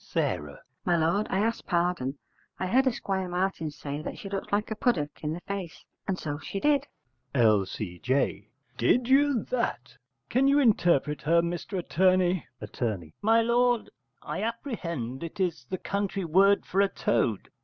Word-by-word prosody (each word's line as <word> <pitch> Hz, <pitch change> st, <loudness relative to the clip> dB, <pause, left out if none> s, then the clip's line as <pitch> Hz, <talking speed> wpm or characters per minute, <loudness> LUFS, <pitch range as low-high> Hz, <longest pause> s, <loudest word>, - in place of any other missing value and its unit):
S. 75 Hz, -1 st, -1 dB, 0.3 s
My 175 Hz, -1 st, +2 dB
lord, 170 Hz, +6 st, +1 dB
I 190 Hz, -, 0 dB
ask 230 Hz, +2 st, 0 dB
pardon; 170 Hz, -7 st, 0 dB, 0.4 s
I -, -, -2 dB
heard 260 Hz, +8 st, +3 dB
Esquire 195 Hz, -6 st, -1 dB
Martin 180 Hz, -3 st, -1 dB
say 145 Hz, 0 st, -6 dB
she 195 Hz, -, -8 dB
looked 195 Hz, -1 st, -4 dB
like 210 Hz, +2 st, 0 dB
a -, -, -1 dB
puddock 170 Hz, -12 st, -1 dB
in 150 Hz, -, -1 dB
the 175 Hz, -, -6 dB
face; 185 Hz, -4 st, -6 dB, 0.2 s
and 190 Hz, -, 0 dB
so 145 Hz, -4 st, -4 dB
she 160 Hz, +6 st, -5 dB
did. 285 Hz, +2 st, +2 dB, 0.5 s
L.C.J. 105 Hz, 0 st, +1 dB, 0.3 s
Did 235 Hz, -, +3 dB
you 275 Hz, -3 st, +4 dB
that? 235 Hz, -, -2 dB, 0.3 s
Can 260 Hz, -, +2 dB
you 280 Hz, +1 st, +5 dB
interpret 170 Hz, -, +3 dB
her, 170 Hz, +3 st, +3 dB
Mr 175 Hz, +3 st, -3 dB
Attorney? 185 Hz, 0 st, +2 dB
Att. 105 Hz, +3 st, -10 dB, 0.4 s
My 225 Hz, +2 st, +4 dB
lord, 240 Hz, 0 st, +2 dB, 0.3 s
I -, -, -4 dB
apprehend 170 Hz, -, -4 dB
it 170 Hz, +5 st, -7 dB
is 165 Hz, -9 st, -1 dB
the 185 Hz, -, -2 dB
country 200 Hz, 0 st, -2 dB
word 195 Hz, +5 st, +4 dB
for 195 Hz, -, +1 dB
a 200 Hz, -, +4 dB
toad. 115 Hz, -, 0 dB
185 Hz, 155 wpm, -28 LUFS, 150-215 Hz, 0.5 s, you